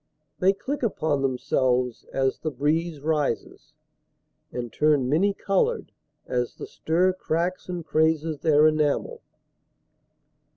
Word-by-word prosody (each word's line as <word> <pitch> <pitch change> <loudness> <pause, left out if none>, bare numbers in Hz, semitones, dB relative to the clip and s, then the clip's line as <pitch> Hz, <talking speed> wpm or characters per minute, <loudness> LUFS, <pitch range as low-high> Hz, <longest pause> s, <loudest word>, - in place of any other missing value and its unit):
They 185 +1 +5
click 270 +8 -4
upon 160 - 0
themselves 125 -2 0
As 135 -1 0
the 155 - -2
breeze 155 +3 -1
rises, 150 -5 -2 0.8
and 120 -2 -5
turn 150 -4 +2
many 170 +9 +3
colored 200 - 0 0.3
As 125 -1 -2
the - - -7
stir 180 +4 +1
cracks 180 +1 -2
and 175 -3 -4
crazes 160 -1 +1
their 155 -1 +4
enamel. 155 - +1
155 Hz, 115 wpm, -25 LUFS, 135-180 Hz, 0.8 s, They